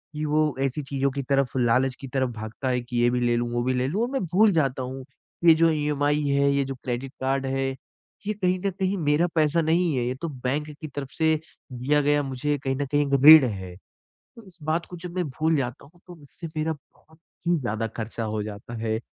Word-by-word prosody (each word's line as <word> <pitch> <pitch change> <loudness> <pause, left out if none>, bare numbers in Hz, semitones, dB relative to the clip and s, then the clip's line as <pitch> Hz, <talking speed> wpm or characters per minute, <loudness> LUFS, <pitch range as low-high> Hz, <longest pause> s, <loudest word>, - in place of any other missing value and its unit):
कि 150 +1 -2
वो 150 -1 +1
ऐसी 135 +2 -1
चीज़ों 140 0 -1
की 140 +1 -3
तरफ 140 -2 +2
लालच 125 +2 +2
की 135 - -7
तरफ 130 0 0
भागता 110 +5 -4
है 125 -1 0
कि 120 0 -5
ये 120 - +4
भी 125 0 0
ले 120 -1 +2
लूँ, 120 0 -1
वो 120 0 0
भी 130 +1 +1
ले 125 +1 0
लूँ 195 +10 -1
और 240 - 0
मैं 270 - -1
भूल 210 +2 +6
जाता 135 -5 +1
हूँ 130 +1 -6
कि 170 - -7
ये 165 - +10
जो 165 - +6
ईएमआई 150 -1 +1
है, 140 0 +3
ये 140 0 +2
जो 135 - -5
क्रेडिट 125 +1 -4
कार्ड 135 +1 0
है 135 0 -1 0.6
ये 215 - +1
कहीं 185 -2 0
न - - +3
कहीं 190 +1 0
मेरा 150 +1 +2
पैसा 160 +1 +3
नहीं 165 0 +2
है। 125 -2 0
ये 125 +1 -2
तो 165 - -2
बैंक 145 +4 -1
की 155 - -5
तरफ 140 -1 -7
से 160 0 +2 0.4
दिया 135 +4 +1
गया 145 +1 +2
मुझे 140 +2 -2
कहीं 135 0 0
न - - 0
कहीं 145 0 +2
एक 140 - -3
ऋण 155 -4 +11
है। 95 -4 -7 0.6
तो 230 - -12
इस 185 - -16
बात 160 +2 0
को 180 - -9
जब 175 0 -8
मैं 180 - +1
भूल 155 +4 0
जाता 130 -3 -3
हूँ 165 +5 -21
तो 180 - -10
उससे 145 +4 -10
मेरा 155 +1 0
बहुत 155 +2 -18 0.3
ही 175 - +4
ज़्यादा 115 -4 -2
खर्चा 115 0 -4
हो 110 -1 -2
जाता 105 +3 -8
है। 110 -1 0
140 Hz, 240 wpm, -25 LUFS, 125-155 Hz, 0.6 s, ऋण